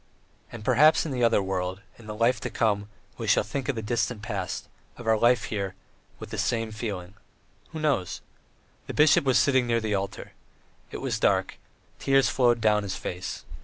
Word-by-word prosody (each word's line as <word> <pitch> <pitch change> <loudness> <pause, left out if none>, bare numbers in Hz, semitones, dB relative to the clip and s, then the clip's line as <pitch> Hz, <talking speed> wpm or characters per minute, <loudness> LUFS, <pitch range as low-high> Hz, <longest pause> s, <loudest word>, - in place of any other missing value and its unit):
And 110 -3 -9
perhaps 155 +8 +5
in 155 - -3
the 125 -2 -1
other 115 -4 +3
world, 95 0 -3 0.2
in 110 - -13
the 105 - -5
life 115 +3 +2
to - - -3
come, 105 -2 0 0.3
we - - -4
shall - - +4
think 130 +6 -4
of 140 - 0
the 110 - -4
distant 110 -1 -1
past, 100 -5 -4 0.3
of 120 - -10
our 110 0 +4
life 120 +1 +3
here, 100 -2 -3 0.4
with - - -10
the - - -4
same 115 -2 -1
feeling. 100 -5 -5 0.6
Who 160 - -7
knows? 140 - -1 0.7
The - - -6
bishop 150 -2 +5
was 130 -2 +4
sitting 130 -3 +3
near 115 -1 +2
the 110 -2 -2
altar. 100 0 -4 0.6
It - - -7
was - - -2
dark; - - +1 0.4
tears 135 -1 +3
flowed 120 -2 +3
down 105 -1 +3
his 100 -2 -4
face. 90 +1 -6
110 Hz, 190 wpm, -26 LUFS, 100-125 Hz, 0.7 s, perhaps